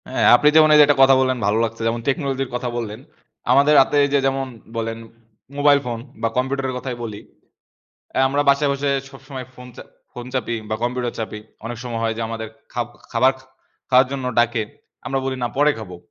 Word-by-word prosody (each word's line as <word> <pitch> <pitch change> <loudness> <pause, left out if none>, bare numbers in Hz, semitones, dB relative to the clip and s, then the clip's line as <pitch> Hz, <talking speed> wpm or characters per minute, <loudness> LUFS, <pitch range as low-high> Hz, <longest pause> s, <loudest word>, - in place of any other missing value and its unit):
হ্যাঁ, - - 0
আপনি 150 - +3
যেমন 155 -1 +7
এই - - +7
যে, - - +10
একটা 145 -1 +2
কথা 135 0 +6
বললেন, 130 -1 +1
ভালো 105 +2 +2
লাগছে। 115 0 -4
যেমন 115 +1 -1
টেকনলজির 135 -2 -1
কথা 125 0 -2
বললেন। 110 -2 -5 0.5
আমাদের 145 +2 +5
হাতে 140 - +1
এই - - -3
যে, 140 - +4
যেমন 135 0 -1 0.3
বলেন 115 0 -3 0.6
মোবাইল 145 0 +5
ফোন 120 -2 -3 0.2
বা 115 - +2
কম্পিউটারের 130 0 -1
কথাই 125 -1 -5
বলি। 105 -3 -6 0.9
অ্যা - - 0
আমরা 140 +2 +1
বাসায় 140 +1 +3
বসে 140 +1 -2 0.2
সবসময় 135 -1 -9
ফোন 125 0 -12
চা - - -8 0.3
ফোন 120 0 -8
চাপি 120 -2 -1
বা 110 - 0
কম্পিউটার 120 0 -2
চাপি। 110 -1 -4 0.3
অনেক 120 0 -6
সময় 120 -2 -4
হয় 115 0 0
যে, 115 - -3
আমাদের 110 -1 -5 0.2
খাব-খাবার 120 +1 0 0.6
খাওয়ার 130 0 +6
জন্য 135 -2 -4
ডাকে। 120 -1 +2 0.4
আমরা 135 - -1
বলি, 135 0 -2
না। 120 - 0
পরে 145 +2 +4
খাবো। 90 -5 -8
125 Hz, 195 wpm, -21 LUFS, 115-135 Hz, 0.9 s, যে